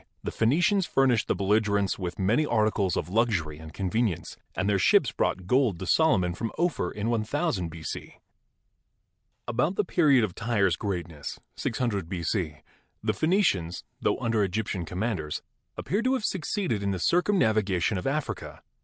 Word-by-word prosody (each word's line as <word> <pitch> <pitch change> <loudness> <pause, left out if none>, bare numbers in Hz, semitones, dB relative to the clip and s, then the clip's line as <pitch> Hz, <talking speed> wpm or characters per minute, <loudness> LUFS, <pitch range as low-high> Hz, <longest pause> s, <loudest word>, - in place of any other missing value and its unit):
the - - -3
Phenicians 170 - +2
furnished 130 -4 +2
the - - +1
belligerents 100 -1 +1
with 90 -2 -4
many 105 +10 +2
articles 110 - +1
of - - -2
luxury 90 -7 0
and 80 -1 -10
convenience, 100 0 -1 0.2
and 90 - -1
their 100 -2 +2
ships - - +4
brought 95 - -1
gold 125 -2 +2
to 95 - -6
Solomon 95 - +3
from 115 +5 -4
Ophir 170 - 0
in 105 - -5
IOOO 115 - -1
B.C. 80 -1 -7 1.3
About 125 +10 0
the 210 - +2
period 150 - +4
of 100 -5 -1
Tyre's 100 -6 +1
greatness 85 -7 -5 0.2
(600 110 -8 -2
b.c.) 85 -4 -2 0.4
the 110 -1 +1
Phenicians, 105 - +1 0.2
tho - - +1
under 115 -4 +1
Egyptian 95 -2 -2
commanders, 90 -5 -3 0.3
appear 200 +9 -1
to 255 +2 +2
have 255 -5 -1
succeeded 180 - -1
in 100 - -1
the 95 - -1
circumnavigation 110 - +2
of - - -4
Africa. 150 +2 -3
105 Hz, 150 wpm, -27 LUFS, 90-135 Hz, 1.3 s, ships